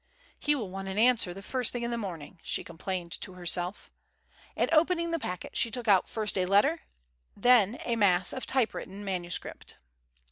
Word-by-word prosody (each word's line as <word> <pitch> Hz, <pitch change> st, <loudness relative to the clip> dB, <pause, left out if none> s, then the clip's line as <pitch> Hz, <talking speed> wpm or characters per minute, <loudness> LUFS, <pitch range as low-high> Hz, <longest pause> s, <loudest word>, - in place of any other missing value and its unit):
"He 295 Hz, 0 st, +2 dB
will 215 Hz, -9 st, -4 dB
want 195 Hz, 0 st, -6 dB
an 190 Hz, +1 st, -4 dB
answer 230 Hz, -4 st, +4 dB
the 195 Hz, +3 st, -9 dB
first 250 Hz, +2 st, 0 dB
thing 245 Hz, -1 st, -4 dB
in 235 Hz, -, -2 dB
the -, -, -1 dB
morning," 180 Hz, -6 st, -6 dB
she -, -, -2 dB
complained 175 Hz, +1 st, -5 dB
to 190 Hz, -, -5 dB
herself. 180 Hz, +1 st, -2 dB, 0.6 s
And -, -, +1 dB
opening 335 Hz, +1 st, +3 dB
the 330 Hz, -, 0 dB
packet, 180 Hz, -, -6 dB
she 230 Hz, -, +3 dB
took 245 Hz, 0 st, -4 dB
out 195 Hz, -3 st, +4 dB
first 215 Hz, -3 st, -1 dB
a 180 Hz, -, +1 dB
letter, 275 Hz, -, +3 dB, 0.5 s
and 200 Hz, -, -19 dB
then 245 Hz, -2 st, +5 dB
a 235 Hz, -, 0 dB
mass 185 Hz, -4 st, +3 dB
of 260 Hz, -, -5 dB
typewritten 210 Hz, -5 st, -1 dB
manuscript. 175 Hz, -3 st, -3 dB
205 Hz, 185 wpm, -29 LUFS, 185-245 Hz, 0.6 s, then